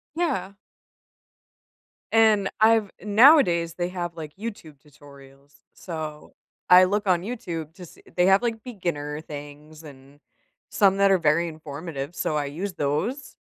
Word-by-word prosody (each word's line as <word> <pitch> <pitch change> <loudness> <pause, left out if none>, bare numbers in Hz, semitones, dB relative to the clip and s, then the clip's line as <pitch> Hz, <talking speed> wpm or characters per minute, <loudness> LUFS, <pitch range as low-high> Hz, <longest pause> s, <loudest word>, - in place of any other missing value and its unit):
Yeah. 315 - -2 1.6
And 220 -3 +4
I've 220 -2 +3
nowadays, 205 - +4
they 175 0 -2
have, 175 -2 -5
like, 155 -2 -8
YouTube 200 -8 -8
tutorials, 140 -1 -18 0.2
so 155 -3 -8 0.4
I 180 +1 +8
look 205 +2 0
on 180 -2 +2
YouTube 170 -8 -6
to 185 -2 -11
see - - -17
they 180 0 +3
have 195 +2 +5
like 225 -2 -3
beginner 165 -10 -4
things 150 +1 -11
and 140 -1 -15 0.5
some 195 -1 +3
that 200 0 +4
are 190 - +5
very 170 +1 +1
informative, 155 0 -7
so 150 - -1
I 145 - -1
use 175 +8 -5
those. 180 - -3
170 Hz, 140 wpm, -24 LUFS, 150-200 Hz, 1.6 s, I